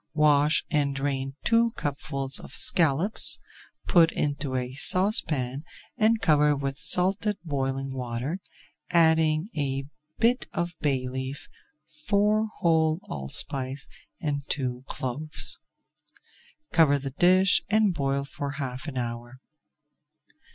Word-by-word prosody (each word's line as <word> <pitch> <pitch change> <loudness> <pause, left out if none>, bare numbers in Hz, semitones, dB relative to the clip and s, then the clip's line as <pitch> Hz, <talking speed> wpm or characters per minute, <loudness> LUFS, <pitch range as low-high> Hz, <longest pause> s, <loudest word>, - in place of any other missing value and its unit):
Wash 150 0 +3
and 140 -2 0
drain 135 -1 -3
two 230 0 +2
cupfuls 140 - -1
of - - -12
scallops, 165 +5 +4 0.5
put 170 -2 +4
into 145 -2 -2
a 125 0 -3
saucepan 145 - +1 0.3
and 225 -1 +2
cover 150 -2 +3
with 135 -1 -3
salted 190 +8 +1
boiling 135 -2 -3
water, 125 +6 -4 0.5
adding 160 -1 +3
a 135 -2 -2 0.3
bit 245 +3 +1
of 170 0 -2
bay 135 -3 -1
leaf, 130 +2 -6 0.6
four 210 +2 +2
whole 160 -1 +2
allspice, 130 - -3 0.3
and 145 -3 -2
two 125 -3 -2
cloves. 145 +5 -1 1.1
Cover 150 -4 +4
the 135 -1 -6
dish 185 +6 +4
and 210 -2 +3
boil 140 -2 -1
for 140 0 -6
half 130 -1 -6
an 135 -4 -6
hour. 120 +1 -5
145 Hz, 110 wpm, -26 LUFS, 135-170 Hz, 1.1 s, scallops